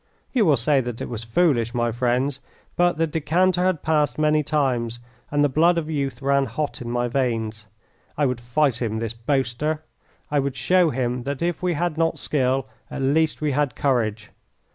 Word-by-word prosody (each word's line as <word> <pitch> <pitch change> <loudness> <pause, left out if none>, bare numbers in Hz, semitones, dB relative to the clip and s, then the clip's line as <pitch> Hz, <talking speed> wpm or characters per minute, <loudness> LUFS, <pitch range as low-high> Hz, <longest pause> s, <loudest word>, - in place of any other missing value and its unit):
You 240 -6 +3
will 150 -5 +4
say 135 +4 +3
that 120 -2 -5
it - - -5
was 115 -1 -5
foolish, 120 -2 +1
my 120 -1 +1
friends, 125 +3 0 0.4
but 175 -2 +2
the 165 - +2
decanter 175 +4 +1
had 185 -4 0
passed 150 -2 +1
many 155 0 +3
times, 130 -6 0 0.3
and 145 0 +2
the - - +5
blood 165 +5 +3
of 160 -1 -2
youth 140 -3 -3
ran 140 0 +3
hot 150 -4 -3
in 120 - -5
my 120 0 0
veins. 115 -4 -2 0.5
I 145 - +2
would 125 -3 -1
fight 120 +1 +1
him, 110 -2 -1
this 115 0 -3
boaster; 135 +5 -1 0.5
I 145 - +3
would 140 -1 -2
show 180 +4 +3
him 125 -2 -1
that 140 +3 -3
if 175 0 -1
we 180 -2 0
had 170 0 -1
not 165 0 +1
skill 130 -2 0 0.2
at 135 - -4
least 155 +4 +1
we 150 -1 +1
had 140 -1 0
courage. 110 -6 0
140 Hz, 190 wpm, -23 LUFS, 120-155 Hz, 0.5 s, the